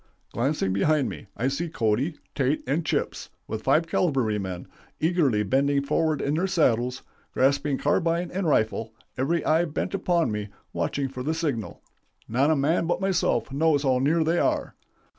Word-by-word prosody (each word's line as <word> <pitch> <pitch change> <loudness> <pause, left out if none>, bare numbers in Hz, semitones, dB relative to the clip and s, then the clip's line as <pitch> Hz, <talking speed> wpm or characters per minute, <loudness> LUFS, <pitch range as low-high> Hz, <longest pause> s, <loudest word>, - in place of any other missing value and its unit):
"Glancing 120 -6 0
behind 145 +8 +2
me, - - -9
I 125 - 0
see 155 +5 -2
Cody, 125 +4 0 0.2
Tait, 135 +2 0
and 145 +6 0
'Chips,' - - -2 0.2
with 110 - -4
five 150 +7 +3
cavalrymen, 110 - -1 0.3
eagerly 155 -10 +2
bending 140 +6 +1
forward 155 +1 0
in 140 - 0
their 175 +5 +1
saddles, 125 -9 +1 0.3
grasping 140 +1 +2
carbine 170 +3 0
and 185 -1 -2
rifle, 110 -4 0 0.2
every 155 +5 0
eye 160 +2 +3
bent 155 +4 -3
upon 175 - +1
me, 105 -1 -4 0.2
watching 140 -1 -1
for 130 -1 -7
the 155 +5 -1
signal. 145 -10 -3 0.4
Not 130 +6 +2
a 160 - +4
man 155 +4 +1
but 175 +1 0
myself 185 - 0
knows 145 0 +2
how 130 -2 +2
near 155 +5 +2
they 165 +2 +1
are. - - 0
140 Hz, 160 wpm, -26 LUFS, 125-165 Hz, 0.4 s, a